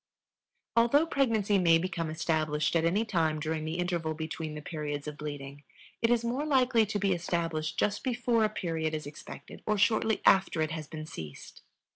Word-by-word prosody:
Although 235 +7 +5
pregnancy 220 -10 +2
may 165 -2 +5
become 170 -2 -2
established 155 -1 0
at 165 0 +3
any 200 +7 +2
time 160 -7 +1
during 155 0 -2
the 160 +1 -3
interval 170 -3 -1
between 160 0 -5
the 150 - -6
periods 150 -3 -4
of 150 - -5
bleeding, 145 -1 -7 0.4
it 230 - +3
is 235 -1 +2
more 250 +5 -1
likely 255 -6 +3
to 210 - -2
be 200 -1 +2
established 165 -2 -2
just 205 0 0
before 245 -3 +1
a 215 - +3
period 160 -6 -2
is 155 - -5
expected 145 +1 -10
or 215 -1 +2
shortly 220 +1 +2
after 190 -3 +4
it 155 - -2
has 155 -2 -5 0.2
ceased. 80 - -9
170 Hz, 175 wpm, -30 LUFS, 155-220 Hz, 0.4 s, Although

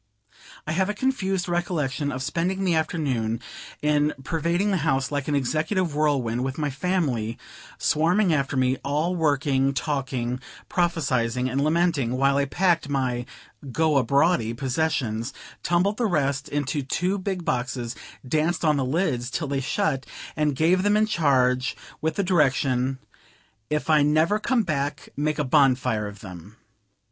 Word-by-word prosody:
I 155 - -3
have 190 +4 +1
a 210 - -2
confused 195 -7 -1
recollection 155 -5 -1
of 130 0 -4
spending 185 +6 -1
the 180 -3 +2
afternoon 140 -9 -1 0.4
in 150 0 +2
pervading 170 +6 0
the 190 - +2
house 135 -5 0
like 145 -2 -2
an 150 - +1
executive 155 +6 0
whirlwind, 135 -6 +1
with 130 0 -3
my 150 -2 -1
family 135 - -1 0.4
swarming 175 +4 +2
after 140 -2 0
me, 130 0 +2
all 150 +6 0
working, 140 -4 +1
talking, 130 -5 -2 0.3
prophesying 130 -8 0
and 135 +2 0
lamenting, 155 -6 +1
while 135 +1 +3
I 140 - +2
packed 170 +1 +1
my 125 -3 -1 0.4
"go 150 -1 +2
abroady" 130 -3 +2
possessions, 130 -4 -1 0.3
tumbled 185 +4 +1
the 235 - +1
rest 145 -5 0
into 145 0 -1
two 180 +8 -1
big 185 -2 -3
boxes, 120 -1 -2 0.3
danced 160 +5 0
on 150 -2 +3
the 135 - +1
lids 130 -4 0
till 155 +2 -3
they 140 -1 -1
shut, 135 -2 -1 0.3
and 150 -2 +1
gave 170 +6 +3
them 205 +2 +3
in 215 - +4
charge, 130 -9 +2 0.2
with 160 0 -1
the 200 - 0
direction, 135 -6 +2 0.7
"If 150 0 -1
I 155 -2 +5
never 155 +8 +3
come 240 +1 +1
back, 145 -5 -3
make 150 +2 -1
a 150 - +1
bonfire 130 -6 +2
of 100 0 -10
them." 95 +2 -11
145 Hz, 150 wpm, -25 LUFS, 130-170 Hz, 0.7 s, I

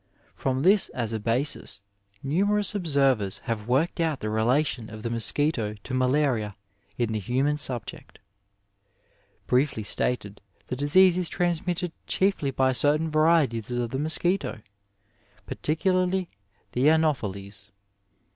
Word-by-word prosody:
From 130 0 -2
this 195 +3 +4
as 115 -3 -3
a 110 - -2
basis, 115 -2 -1 0.4
numerous 200 +9 +1
observers 135 - +1
have 110 -2 -4
worked 135 +9 +1
out 160 -5 0
the 110 - -3
relation 120 +2 0
of 110 0 -9
the 115 - -3
mosquito 115 -1 0
to 130 - -7
malaria 130 -5 +1 0.4
in 120 -2 0
the 110 - -1
human 135 +8 0
subject. 125 -6 -3 1.3
Briefly 125 -3 +1
stated, 105 -1 0 0.3
tHe 130 - -2
disease 180 +6 +5
is 180 - -2
transmitted 175 0 -1 0.2
chiefly 190 -7 +1
by 130 0 +1
certain 150 +4 +1
varieties 155 -8 +2
of 120 -1 -2
the 130 - -2
mosquito, 160 - 0 0.8
particularly 185 +3 0 0.4
the 130 +5 +3
Ano 160 -1 +4
pheles. 100 -3 -7
135 Hz, 125 wpm, -26 LUFS, 115-160 Hz, 1.3 s, disease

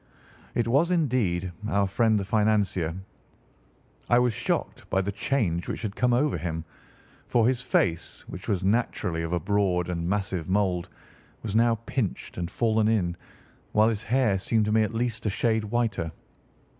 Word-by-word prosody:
It 120 -1 +1
was, 140 +8 +3
indeed, 120 - +1 0.2
our 100 -2 +2
friend 110 +2 +2
the 100 - -3
financier. 105 -6 +1 1.1
I 120 - +5
was 125 -1 +3
shocked - - -2
by 95 - +2
the 100 +1 -2
change 100 -7 -1
which - - -4
had 105 -2 -3
come 125 -1 +2
over 125 - +2
him, 80 0 -4 0.6
for 115 -2 +3
his 125 -1 +1
face 85 -8 0
which 90 - -8
was 95 -5 0
naturally 95 -5 0
of 80 0 -3
a 90 - +1
broad 90 -1 +1
and 85 -1 -2
massive 95 -4 -2
mould, 95 -3 +1 0.5
was 105 -3 -3
now 115 0 +4
pinched 120 -8 -3
and 85 -1 -2
fallen 110 -1 +1
in, 95 -6 +1 0.6
while 110 +1 +5
his 110 -2 -2
hair 115 -5 +2
seemed 110 +2 +1
to 105 - 0
me 110 0 +4
at 110 - 0
least 115 -1 -1
a - - +3
shade 110 +2 +1
whiter. 105 -7 -1
105 Hz, 170 wpm, -26 LUFS, 90-115 Hz, 1.1 s, I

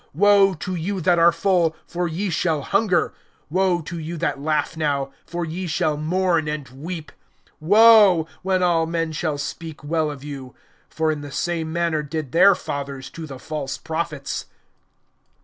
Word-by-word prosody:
(25)Woe 200 -1 +5
to 185 - -4
you 185 +3 -2
that 175 0 +3
are 170 +1 +6
full; 175 -5 +1
for 175 0 -2
ye 180 +4 -2
shall 160 -3 0
hunger. 200 -1 +1 0.4
Woe 185 -1 +2
to 170 +2 -6
you 165 +2 -5
that 160 -3 -2
laugh 155 +2 0
now; 140 -3 -1 0.2
for 175 0 -3
ye 175 +3 -4
shall 155 -1 0
mourn 165 +1 +1
and 150 -2 -4
weep. 155 +5 -7 0.5
(26)Woe! 205 -2 +6
when 185 -1 +1
all 165 -2 +2
men 165 -1 -1
shall 155 -1 -2
speak 160 +1 -6
well 155 +1 0
of 145 -2 -8
you; 135 -3 -8 0.3
for 160 0 0
in 150 -1 -4
the 145 -1 -8
same 165 +1 -2
manner 170 -2 0
did 150 -2 -5
their 190 +3 +6
fathers 140 -4 -6
to 165 -1 -8
the 135 -2 -8
false 145 0 -5
prophets. 160 -3 -4
165 Hz, 165 wpm, -22 LUFS, 150-180 Hz, 0.5 s, are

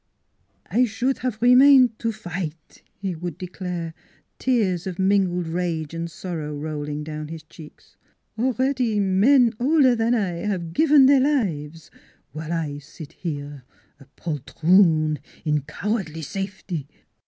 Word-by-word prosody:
" - - -43 0.2
I 250 +3 +2
should 245 +4 -1
have 250 -4 -3
remained 250 -1 +6
to 230 - -1
fight," 175 -7 -7 0.2
he 195 -2 -3
would 170 -1 -6
declare, 180 -2 -5 0.5
tears 200 -9 +1
of 180 -2 -5
mingled 190 -3 +1
rage 165 -2 -2
and 165 0 -4
sorrow 160 -4 -5
rolling 150 0 -4
down 155 0 -6
his 160 0 -8
cheeks. 155 0 -15 0.2
" 220 - -20
Already 255 -2 +1
men 225 +6 +4
older 265 -1 +4
than 230 +1 +1
I 190 -6 -1
have 180 -5 -3
given 295 - +6
their 275 0 +6
lives, 165 - -1 0.4
while 155 +1 -6
I 155 -4 -2
sit 150 +1 -12
here 145 -4 -6 0.4
a 140 - -15
poltroon 155 0 +2 0.3
in 150 -1 +1
cowardly 175 -2 -3
safety! 190 -3 -5
180 Hz, 135 wpm, -23 LUFS, 155-225 Hz, 0.5 s, remained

